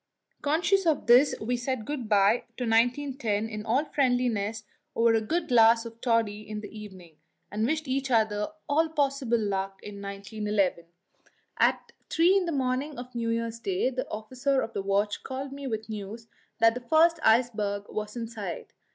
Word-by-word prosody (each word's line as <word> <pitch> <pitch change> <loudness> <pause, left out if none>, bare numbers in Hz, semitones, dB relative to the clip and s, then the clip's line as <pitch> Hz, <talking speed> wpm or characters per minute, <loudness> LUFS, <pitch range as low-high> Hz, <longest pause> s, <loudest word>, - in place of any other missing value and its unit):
Conscious 340 +5 +2
of 310 -3 +1
this, 250 +4 +6
we 240 +3 -1
said 245 -2 -3
good 260 -6 -4
bye 205 +2 +3
to 250 - -3
1910 235 -2 +1
in 215 -1 -6
all 250 +7 +1
friendliness 245 -6 0 0.3
over 230 0 +4
a 225 - +2
good 325 +9 -1
glass 230 -1 +5
of 230 0 -10
toddy 225 -4 +1
in 215 0 -6
the 215 - -10
evening, 185 -7 -11 0.3
and 215 +2 0
wished 310 +1 -1
each 270 +1 -1
other 215 -3 +2 0.2
all 315 +2 +2
possible 275 -5 0
luck 195 -2 -2
in 200 -1 -8
1911. 200 -2 -2 0.7
At - - +2 0.2
three 345 +4 +4
in 390 -2 +2
the - - -1
morning 270 +1 -1
of 250 +1 -8
New 230 -1 -2
Year's 230 0 -2
Day 370 - 0
the 255 0 -4
officer 255 +5 -1
of 225 - -5
the 200 - -2
watch 200 +2 0
called 270 +1 -5
me 280 0 -6
with 220 -3 -4
news 220 +1 -7 0.3
that 225 -1 +5
the 250 - -6
first 320 +6 +4
iceberg 215 -3 +2
was 210 +1 -5
in 230 -1 -4
sight. 210 -6 -7
230 Hz, 175 wpm, -27 LUFS, 210-270 Hz, 0.7 s, this